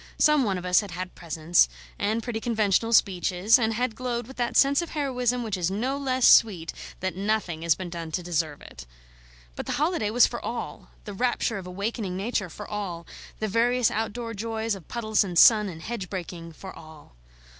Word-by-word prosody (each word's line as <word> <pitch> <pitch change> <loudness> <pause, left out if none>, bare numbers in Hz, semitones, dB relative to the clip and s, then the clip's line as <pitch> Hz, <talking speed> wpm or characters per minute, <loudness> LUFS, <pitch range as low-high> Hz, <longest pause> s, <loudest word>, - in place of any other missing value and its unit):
Some 300 -2 +4
one 195 -3 0
of 180 - -6
us 180 0 +4
had 205 - -8
had 180 +1 -6
presents, 165 - +2 0.3
and 220 +2 0
pretty 230 -2 -3
conventional 225 -1 +1
speeches, 195 +1 +3
and 225 -1 0
had 245 0 -1
glowed 240 -1 -3
with 265 +3 -12
that 240 -1 0
sense 280 +3 +5
of 340 - -6
heroism 250 -4 0
which 215 -3 -2
is 180 -2 -1
no 240 +8 -1
less 260 -3 +2
sweet 180 -8 +5 0.3
that 185 0 -2
nothing 195 -4 -1
has 165 -2 +3
been 185 -2 -7
done 170 -1 -6
to 180 - -2
deserve 160 -4 -2
it. - - -12 0.7
But - - -6
the - - -1
holiday 305 - 0
was 240 +3 +5
for 235 - -5
all, 240 - -6 0.2
the 205 - -6
rapture 235 0 0
of 185 - -9
awakening 200 0 -3
Nature 200 -2 -2
for 210 - -9
all, 185 -5 -5 0.3
the 215 - -2
various 240 +3 +2
outdoor 230 +1 -3
joys 225 +1 -2
of 195 -4 -9
puddles 220 -3 +1
and 180 -3 -4
sun 210 +2 +7
and 160 -2 -9
hedge 220 -6 -5
breaking 170 -3 -6
for 190 +4 -10
all. 155 - -14
210 Hz, 200 wpm, -26 LUFS, 180-235 Hz, 0.7 s, sun